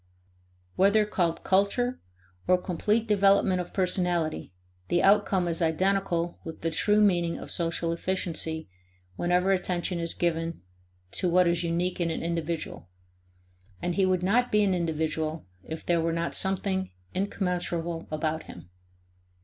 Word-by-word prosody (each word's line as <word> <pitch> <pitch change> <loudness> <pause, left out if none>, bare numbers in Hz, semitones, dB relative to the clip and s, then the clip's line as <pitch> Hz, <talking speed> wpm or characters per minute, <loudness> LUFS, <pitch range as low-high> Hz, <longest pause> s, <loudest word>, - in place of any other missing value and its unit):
Whether 205 +3 +4
called 175 -5 -1
culture 200 +6 +1 0.5
or 180 - +5
complete 210 +6 0
development 195 -3 +3
of 175 - -8
personality, 180 - 0 0.4
the 175 - +1
outcome 195 -2 +3
is 170 0 0
identical 175 +1 0
with 160 - -8
the 165 - -1
true 210 +6 +3
meaning 175 -5 +2
of - - -5
social 165 0 -1
efficiency 165 -3 -2 0.5
whenever 180 - +2
attention 180 -1 -1
is 170 -1 0
given 165 - -1 0.5
to 180 - 0
what 180 +1 +4
is 170 0 +1
unique 175 +2 -1
in 170 - +1
an 160 - -3
individual 165 - -3 0.9
and 175 - -2
he 190 +2 +2
would 185 -1 +1
not 240 +6 +2
be 210 0 +4
an 195 -2 +2
individual 160 -2 -2 0.2
if 160 0 -7
there 170 -1 +2
were 165 0 0
not 170 0 -2
something 190 0 0 0.2
incommensurable 175 -4 -2
about 155 +1 -2
him. 90 - -12
175 Hz, 140 wpm, -27 LUFS, 165-190 Hz, 0.9 s, or